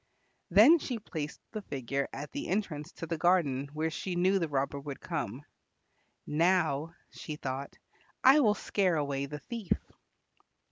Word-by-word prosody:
Then 230 - +8
she 250 -4 -3
placed 160 -8 -5
the 215 - -4
figure 140 - -3
at 145 +1 -6
the - - -4
entrance 170 -6 -2
to - - -6
the 165 -1 -3
garden 145 -7 +2
where 155 +2 -1
she 180 +3 -4
knew 185 +3 +3
the 165 - 0
robber 140 0 -1
would 140 -1 -7
come. 125 +8 -4 0.8
"Now," 165 -1 +1 0.2
she 155 - -6
thought, 135 -1 -5 0.5
"I 270 +3 +8
will 215 -7 +4
scare 190 -5 +1
away 140 -2 -1
the 150 +1 -6
thief." 225 - -2
160 Hz, 150 wpm, -31 LUFS, 140-190 Hz, 0.8 s, Then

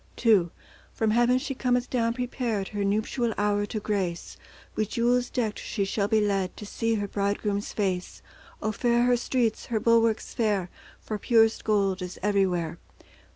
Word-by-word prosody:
II 200 -7 +5 0.4
From 220 -1 +1
heaven 240 +2 +4
she 265 +1 -3
cometh 250 -1 0
down 230 -2 0
prepared 240 -5 -2
Her 205 -1 -3
nuptial 220 +3 0
hour 205 0 +1
to 215 - -3
grace; 195 -5 -3 0.4
With 215 -1 -1
jewels 245 +2 +1
decked 225 -5 -2
she 200 -3 -2
shall 200 +1 0
be 220 0 +3
led 195 -3 0
To 210 - -7
see 230 +2 -1
her 205 -1 -2
Bridegroom's 200 +1 -1
face. 185 -3 -2 0.4
O 215 - +1
fair 240 +2 +2
her 245 0 +4
streets, 240 -2 -1
her 225 -2 0
bulwarks 230 0 +2
fair, 205 -7 0 0.3
For 215 -1 -5
purest 225 0 +3
gold 200 -3 +1
is 180 0 -6
everywhere. 180 -5 +1
215 Hz, 160 wpm, -27 LUFS, 200-235 Hz, 0.4 s, II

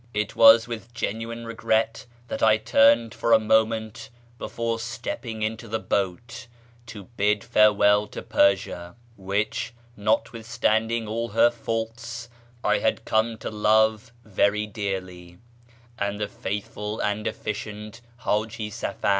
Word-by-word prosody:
It 105 0 -2
was 115 +1 +7
with 120 0 -8
genuine 115 +1 -4
regret 115 0 -1 0.2
that - - -5
I 110 -1 +5
turned 115 +1 +4
for 115 - +1
a 110 - +7
moment 110 0 0 0.3
before 115 -1 -3
stepping 115 -1 -5
into 110 +2 -3
the 110 +1 -1
boat 100 +2 -3 0.4
to 105 -3 -9
bid 105 -2 0
farewell 105 -2 +4
to - - -8
Persia 90 -3 +1 0.2
(which, 105 +4 -2 0.2
notwithstanding 110 +1 0
all 115 +2 -3
her 120 - +4
faults, 115 0 -5 0.3
I - - +2
had - - 0
come 110 +1 +1
to - - -6
love 110 +1 +2
very 105 0 +1
dearly) 95 -4 -5 0.6
and 100 0 -2
the 105 - -1
faithful 105 +2 -5
and 105 +1 -1
efficient 105 +1 -6 0.2
Haji 110 -1 -2
Safar. 100 - -3
110 Hz, 125 wpm, -25 LUFS, 105-115 Hz, 0.6 s, was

